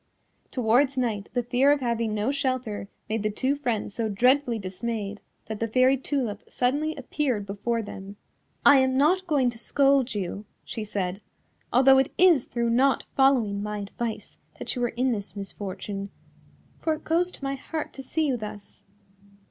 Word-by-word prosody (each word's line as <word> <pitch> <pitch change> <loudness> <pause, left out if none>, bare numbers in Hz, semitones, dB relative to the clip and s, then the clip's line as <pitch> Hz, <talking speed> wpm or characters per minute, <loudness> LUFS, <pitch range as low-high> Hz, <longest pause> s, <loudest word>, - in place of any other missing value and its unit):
Towards 255 +3 +2
night 220 -5 -1
the 245 0 0
fear 250 +4 +3
of 290 - +3
having 230 -3 -1
no 215 +5 0
shelter 255 -7 -2 0.2
made 220 0 -1
the 215 - 0
two 260 +6 0
friends 240 -8 -2
so 225 0 -1
dreadfully 250 +4 +3
dismayed 205 +1 -4 0.2
that 220 -1 -5
the 230 - 0
Fairy 255 +4 +4
Tulip 260 -5 -2
suddenly 290 +5 0
appeared 260 -5 -2
before 225 +4 -2
them. 195 -1 -8 0.5
"I 285 - +9
am 260 0 +3
not 360 +7 +3
going 275 -6 +2
to 230 - -8
scold 270 -1 +2
you," 200 +1 -4 0.2
she 220 - -5
said, 195 -2 -3 0.5
"although 265 +1 +6
it 265 - +1
is 345 -8 +5
through 235 -1 -1
not 265 +3 +3
following 245 -7 +3
my 210 0 -3
advice 215 +3 -5 0.2
that - - -4
you 245 - -1
are - - 0
in 250 +3 0
this 205 -3 -4
misfortune, 200 0 -5 0.7
for 320 -1 0
it 310 - -13
goes 345 +3 +1
to - - -13
my 275 0 -1
heart 300 +3 -5
to 270 - -8
see 315 +4 -1
you 265 -4 +1
thus. 210 -2 -9
245 Hz, 170 wpm, -26 LUFS, 210-270 Hz, 0.7 s, I